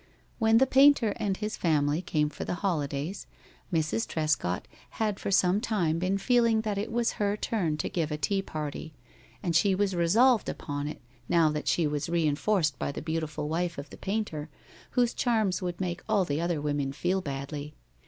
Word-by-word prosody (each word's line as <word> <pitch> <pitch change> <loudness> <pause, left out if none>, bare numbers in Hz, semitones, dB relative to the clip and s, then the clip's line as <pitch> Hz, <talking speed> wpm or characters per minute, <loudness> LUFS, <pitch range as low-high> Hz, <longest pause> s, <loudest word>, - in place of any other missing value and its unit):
When 225 0 +5
the 265 - +6
painter 265 -5 +5
and 205 -4 -1
his 210 0 -3
family 150 -1 +1
came 150 -4 0
for 150 - -6
the - - -2
holidays, 150 0 -2 0.4
Mrs. 165 +7 0
Trescott 155 - -1 0.3
had 210 -2 0
for - - -3
some 190 +1 +3
time 175 -9 0
been 185 +2 +1
feeling 230 0 +3
that 210 -2 -2
it 215 +3 -3
was 235 0 +1
her 205 0 +1
turn 175 -10 -1
to 150 - -2
give 165 -4 -1
a 150 - -1
tea 195 +5 0
party, 155 -3 -6 0.5
and 170 -3 -1
she 195 +3 +4
was 195 -1 0
resolved 220 +8 +4
upon 145 0 -4
it 150 - -7 0.3
now 165 -2 +4
that 150 0 -4
she 170 - +2
was 150 +1 -2
reinforced 160 0 +1
by - - -1
the - - -6
beautiful 155 -2 -3
wife 170 +2 -1
of 140 +1 -7
the - - -9
painter, 190 -7 -3 0.5
whose 245 -1 +3
charms 220 -6 +1
would 175 -1 -3
make 175 -2 -3
all 195 -3 +3
the 150 0 -1
other 170 -2 0
women 145 -2 -1
feel 180 +6 0
badly. 145 0 -5
175 Hz, 185 wpm, -28 LUFS, 150-205 Hz, 0.5 s, the